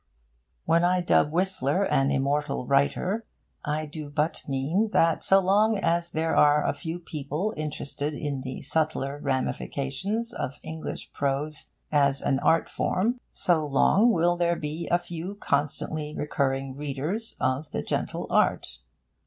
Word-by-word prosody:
When 170 +1 +3
I 180 +1 +3
dub 160 -4 +3
Whistler 185 -1 +1
an 135 -7 +2
immortal 140 0 0
writer, 145 - +1 0.4
I 150 +1 -1
do 150 -1 -7
but 150 +3 -1
mean 150 +11 0
that 165 -1 +3
so 195 - +6
long 205 +3 +3
as 170 -3 +1
there 160 0 -1
are 150 0 +5
a - - +1
few 160 +4 -5
people 160 +4 -3
interested 150 -1 -4
in 145 -2 -3
the 130 0 -6
subtler 145 -1 -1
ramifications 140 - -2
of 140 - -4
English 160 0 -6
prose 145 +2 -2 0.2
as 140 -2 +4
an 135 - +1
art 165 +3 +3
form, 230 +7 0
so 170 -3 +1
long 190 - +4
will 175 -2 +2
there 170 0 +2
be 155 +1 -4
a 175 - +4
few 175 +2 -6
constantly 150 -2 -2
recurring 135 -2 -1
readers 150 +10 -3
of 130 +4 -1
The - - -3
Gentle - - -2
Art. 65 -1 +1
150 Hz, 145 wpm, -26 LUFS, 140-175 Hz, 0.4 s, so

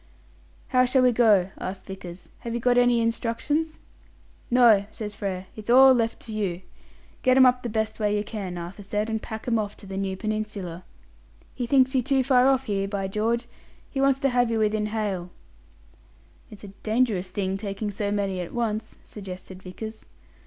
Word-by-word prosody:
"How 255 -1 +4
shall 255 +1 +3
we 250 - +5
go?" 210 -6 +4
asked 185 0 -6
Vickers. 185 -2 -9
"Have 235 0 -5
you - - -1
got 245 +1 +3
any 245 -1 +4
instructions?" 245 +8 -1 0.7
"No," 230 -5 +5
says 210 -1 -6
Frere; 195 -3 -4
"it's 215 +1 -9
all 265 +2 +8
left 230 -2 0
to 225 - -7
you. 190 -4 -2 0.6
Get 255 0 +4
'em 260 - +8
up 250 0 +4
the 240 - -4
best 220 0 -2
way 210 -1 +1
you 205 - -1
can, 195 -5 -5
Arthur 175 +4 -7
said, 210 +2 -2
and 220 -1 -1
pack 220 +1 -7
'em 230 -2 +2
off 210 -1 -4
to - - -14
the 190 0 -6
new 195 -1 -2
peninsula. 210 -5 -4 0.7
He 245 -2 -3
thinks 260 +1 +4
you 260 - +3
too 270 +1 +2
far 255 -1 +4
off 265 -1 +3
here, 195 -4 -1
by 195 -1 -2
George! 230 +4 0 0.5
He 270 - -1
wants 275 -1 +4
to 275 - +3
have 245 -1 +2
you 230 - 0
within 215 -1 +1
hail." 205 -5 -2 1.2
"It's 210 -2 -11 0.2
dangerous 215 -5 0
taking 195 +2 -3
so 200 0 -2
many 200 -2 -1
at 175 - -7
once," 220 -2 -2
suggested 185 -2 -9
Vickers. 220 +4 -8
215 Hz, 180 wpm, -25 LUFS, 195-245 Hz, 1.2 s, all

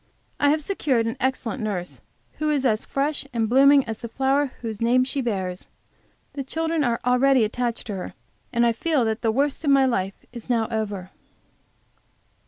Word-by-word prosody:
I 290 - +4
have 305 +1 +1
secured 275 -10 0
an 230 - -2
excellent 260 -1 -1
nurse, 195 -5 -4 0.4
who 305 0 0
is 285 -3 +1
as 220 -3 +1
fresh 285 +2 -1
and 225 -2 0
blooming 275 +3 +6
as 220 -1 -5
the 235 - -5
flower 270 +4 +1
whose 225 -3 -5
name 245 +2 +4
she 270 +2 -2
bears. 190 -6 -3 0.7
The 275 - -4
children 320 +2 -1
are 235 -3 0
already 250 0 +4
attached 235 +2 -2
to 210 - -4
her, 180 - -6 0.4
and 235 0 +2
I 235 - +3
feel 285 +1 +1
that 220 0 -1
the 225 - +2
worst 280 +6 0
of 295 - +1
my 275 -1 +5
life 195 -6 -2
is 235 0 -9
now 230 -2 +1
over. 205 -4 -3
245 Hz, 185 wpm, -24 LUFS, 220-275 Hz, 0.7 s, blooming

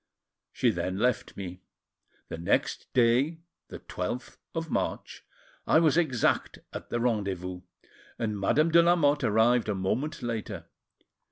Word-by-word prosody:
She - - +2
then 95 +1 -3
left 125 +3 0
me. 90 -2 -7 0.7
The 80 - -6
next 85 - 0
day, 125 +6 +3 0.3
the - - -8
12th, 105 +8 -5 0.2
of 165 0 -3
March, - - -3 0.4
I - - +5
was 160 -3 +4
exact 155 -9 +1 0.2
at - - -7
the 120 - -1
rendezvous, 95 -6 -1 0.6
and 110 -3 -2
Madame 155 +11 +2
de 170 +1 +7
Lamotte 150 -4 +3
arrived 110 +1 +3
a 105 - 0
moment 115 +12 -2
later. 115 -4 -4
120 Hz, 135 wpm, -28 LUFS, 100-150 Hz, 0.7 s, de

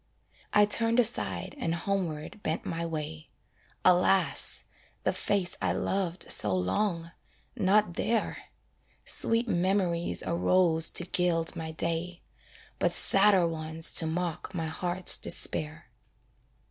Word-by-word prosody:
I 210 0 +4
turned 230 +3 0
aside 100 - +1
and 165 0 -2
homeward 170 -1 -5
bent 160 -2 -4
my 170 0 -4
way; 155 0 -7 0.6
Alas! 185 +1 +2 0.4
the - - 0
face 195 -4 -2
I - - -1
loved 185 -2 -3
so 105 -3 +3
long 170 - -3 0.4
not 210 -3 +1
there 225 +6 -3 0.6
Sweet 230 +2 +3
memories 175 -2 -1
arose 170 -1 +1
to 175 - +5
gild 170 -2 -1
my 160 -1 -6
day, 165 +2 -4 0.6
But - - 0
sadder 195 -3 +4
ones 160 0 +1
to 160 - +7
mock 175 +2 -5
my 165 -2 -3
heart's 175 +3 +2
despair. 155 0 +1
175 Hz, 115 wpm, -27 LUFS, 160-195 Hz, 0.6 s, to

